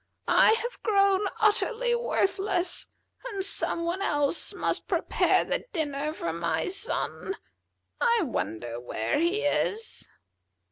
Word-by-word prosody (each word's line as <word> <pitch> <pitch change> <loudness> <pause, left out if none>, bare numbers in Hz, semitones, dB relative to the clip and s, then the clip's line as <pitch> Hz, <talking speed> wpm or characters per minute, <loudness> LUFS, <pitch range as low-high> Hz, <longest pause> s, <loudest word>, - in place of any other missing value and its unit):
I - - +6
have 480 +2 -3
grown 395 -2 +3
utterly 460 +3 +2
worthless, 390 -6 0 0.4
and 390 -4 -2
some 340 -3 0
one 350 +3 -2
else 290 -4 0
must - - -2
prepare - - +2
the - - -1
dinner 300 -3 -1
for 170 - -4
my 170 - -1
son. 390 0 -3 0.6
I 470 -1 +3
wonder 120 - -3
where 115 - -1
he 350 +7 +1
is." 450 +2 -1
385 Hz, 120 wpm, -27 LUFS, 290-430 Hz, 0.6 s, I